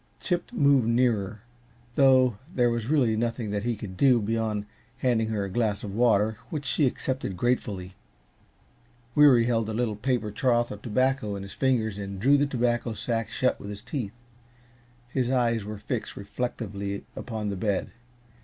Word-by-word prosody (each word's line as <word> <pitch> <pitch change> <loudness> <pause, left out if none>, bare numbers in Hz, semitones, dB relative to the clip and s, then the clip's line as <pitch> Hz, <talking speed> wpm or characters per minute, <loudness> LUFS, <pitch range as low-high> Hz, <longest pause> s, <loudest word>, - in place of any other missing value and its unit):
Chip 175 +3 -2
moved 140 - +4
nearer, 115 -4 +1 0.5
though 130 -5 +4
there 120 -6 +2
was 115 -1 -2
really 130 -7 +3
nothing 115 -1 -2
that 105 0 -1
he 120 +2 -1
could 100 -3 -8
do 130 +1 +5
beyond 110 -1 -1 0.3
handing 115 -3 +1
her 110 -2 -1
a - - -5
glass 105 -2 0
of 100 - -5
water, 110 -1 +2
which 150 -4 -4
she 140 +2 +2
accepted 130 -6 -3
gratefully. 95 -5 -1 1.2
Weary 135 -5 +6
held 115 -2 0
a 110 - -3
little 115 -2 0
paper 115 -1 -1
trough 120 +2 +1
of 105 - -7
tobacco 130 -1 0
in 100 - -6
his 100 - -9
fingers 110 -6 0
and 100 -1 -5
drew 135 +7 +5
the 145 0 +3
tobacco 120 -3 0
sack 115 0 -2
shut 130 +3 0
with 100 - -8
his 105 +1 -7
teeth. 120 -4 -4 0.9
His 125 0 -1
eyes 120 -4 +1
were 105 0 -5
fixed 110 +3 -4
reflectively 100 -1 -4
upon 110 -3 -4
the 100 - -2
bed. 100 +1 -1
115 Hz, 165 wpm, -27 LUFS, 105-125 Hz, 1.2 s, Weary